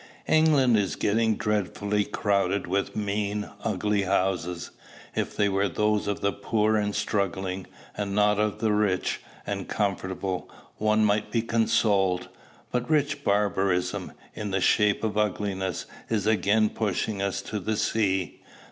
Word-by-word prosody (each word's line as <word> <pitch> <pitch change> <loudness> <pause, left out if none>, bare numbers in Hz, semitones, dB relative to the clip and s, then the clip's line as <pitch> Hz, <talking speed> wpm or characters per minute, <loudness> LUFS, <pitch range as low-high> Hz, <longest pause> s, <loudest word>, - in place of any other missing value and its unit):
England 150 -6 +4
is 100 -2 0
getting 110 +1 +2
dreadfully 105 0 0
crowded 100 -1 0
with 95 +3 -1
mean, 105 0 -1 0.2
ugly 105 -1 0
houses. 90 -3 -1 0.4
If - - -2
they 105 - +3
were 100 0 +1
those 105 +4 +1
of 100 - -2
the 100 - +2
poor 110 +1 +1
and 105 -1 0
struggling, 95 -2 -1 0.3
and 100 -1 -3
not 105 0 +3
of 105 -1 0
the 110 -1 +1
rich 105 -3 0 0.2
and 100 -2 -3
comfortable, 95 -2 -2 0.3
one 110 0 +3
might 105 0 +1
be 115 -2 0
consoled. 100 -5 +2 0.4
But 125 +2 -1
rich 145 -2 +1
barbarism, 100 -3 0 0.2
in 105 - -4
the 95 0 0
shape 105 +3 +3
of 105 -1 0
ugliness, 95 -3 -1 0.2
is 105 -3 0
again 105 0 +3
pushing 105 -1 -1
us 100 -1 -1
to 105 - -4
the 110 +3 -2
sea. 100 -4 0
105 Hz, 140 wpm, -26 LUFS, 95-105 Hz, 0.4 s, England